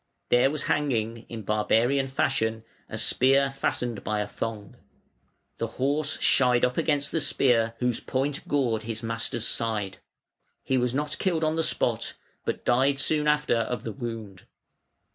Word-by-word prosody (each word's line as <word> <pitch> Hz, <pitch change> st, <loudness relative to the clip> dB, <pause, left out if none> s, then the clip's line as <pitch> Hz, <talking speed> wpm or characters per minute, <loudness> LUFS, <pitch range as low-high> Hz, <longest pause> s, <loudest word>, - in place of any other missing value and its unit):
There 120 Hz, +2 st, +5 dB
was 150 Hz, +1 st, -2 dB
hanging, 115 Hz, -6 st, -1 dB
in 115 Hz, -2 st, -6 dB
barbarian 115 Hz, +6 st, +2 dB
fashion, 115 Hz, -5 st, 0 dB, 0.3 s
a 110 Hz, -, -5 dB
spear 135 Hz, +4 st, +3 dB
fastened 125 Hz, -4 st, -2 dB
by 105 Hz, -1 st, -1 dB
a -, -, -1 dB
thong. 105 Hz, -2 st, -5 dB, 0.8 s
The 115 Hz, -, -1 dB
horse 145 Hz, +3 st, 0 dB
shied 125 Hz, -2 st, +4 dB
up 125 Hz, 0 st, -1 dB
against 145 Hz, -2 st, 0 dB
the 160 Hz, -, 0 dB
spear, 115 Hz, -5 st, +2 dB
whose 125 Hz, -1 st, 0 dB
point 135 Hz, +2 st, -2 dB
gored 125 Hz, -6 st, +1 dB
his 115 Hz, +1 st, -5 dB
master's 115 Hz, 0 st, -1 dB
side. 105 Hz, -4 st, 0 dB, 0.6 s
He 130 Hz, -, 0 dB
was 125 Hz, 0 st, +1 dB
not 150 Hz, +2 st, -2 dB
killed 170 Hz, -4 st, 0 dB
on 155 Hz, 0 st, +1 dB
the 165 Hz, -, +1 dB
spot, -, -, 0 dB, 0.3 s
but -, -, -3 dB
died 135 Hz, +3 st, +3 dB
soon 150 Hz, +2 st, +1 dB
after 150 Hz, -4 st, +2 dB
of 115 Hz, +2 st, -2 dB
the 115 Hz, -, -4 dB
wound. 115 Hz, -7 st, -7 dB
125 Hz, 155 wpm, -26 LUFS, 115-140 Hz, 0.8 s, There